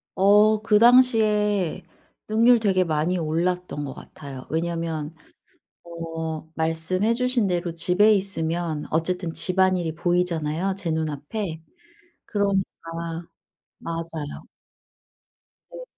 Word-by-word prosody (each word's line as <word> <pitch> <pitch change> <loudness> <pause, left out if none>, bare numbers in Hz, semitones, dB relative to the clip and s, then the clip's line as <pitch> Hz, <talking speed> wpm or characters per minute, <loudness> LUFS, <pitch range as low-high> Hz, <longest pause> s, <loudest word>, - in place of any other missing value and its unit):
어 210 +2 +5
그 215 -1 +3
당시에 215 -6 +4 0.4
능률 230 +3 +5
되게 195 -4 +2
많이 160 +2 0
올랐던 170 -1 -2
것 135 - -6
같아요. 135 -3 -10
왜냐하면 165 -1 -3 0.7
어 165 -2 -6
말씀해 165 +7 0
주신 250 -2 +1
대로 175 -2 -1
집에 185 +6 +4
있으면 170 -5 -2
어쨌든 170 +2 -1
집안일이 180 -1 +1
보이잖아요 175 0 0
제 190 -4 -4
눈앞에? 160 +3 -3 0.6
그러니까 200 -2 +1 1.2
맞아요. 165 -3 -6 1.3
네. - - -9
175 Hz, 220 characters per minute, -24 LUFS, 160-200 Hz, 1.3 s, 어